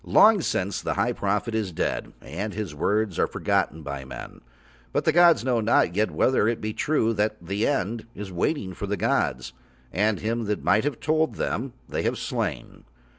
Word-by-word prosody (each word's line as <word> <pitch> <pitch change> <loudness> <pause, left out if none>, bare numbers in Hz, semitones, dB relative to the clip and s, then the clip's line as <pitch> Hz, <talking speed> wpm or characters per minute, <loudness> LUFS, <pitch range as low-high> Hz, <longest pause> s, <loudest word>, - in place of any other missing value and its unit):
Long 215 -3 +6
since 95 - -1
the - - -2
High - - +1
Prophet 105 +3 -1
is 110 -4 -1
dead 80 - -2
and 100 +8 -5
his 105 -7 -4
words 100 +4 0
are - - +3
forgotten 80 +1 -1
by 70 -2 -5
men, 65 - -9 0.5
but - - 0
the - - +5
gods 170 -7 +6
know 125 -3 +2
not 105 -5 +3
yet 105 +2 +2
whether 130 -5 +2
it 115 0 0
be 110 0 -3
true 115 -6 +1
that 105 0 0
The 100 +5 -1
End 115 -4 -1
is 100 -1 -6
waiting 95 - -1
for 100 - -5
the 105 +1 -1
gods, - - 0 0.4
and 105 +1 +1
him 115 0 -2
who 105 - +1
might 105 +4 +2
have 145 -5 -2
told 155 +1 +1
Them 125 +1 -2
They - - -2
have - - 0
slain. - - -4
110 Hz, 190 wpm, -25 LUFS, 100-120 Hz, 0.5 s, Long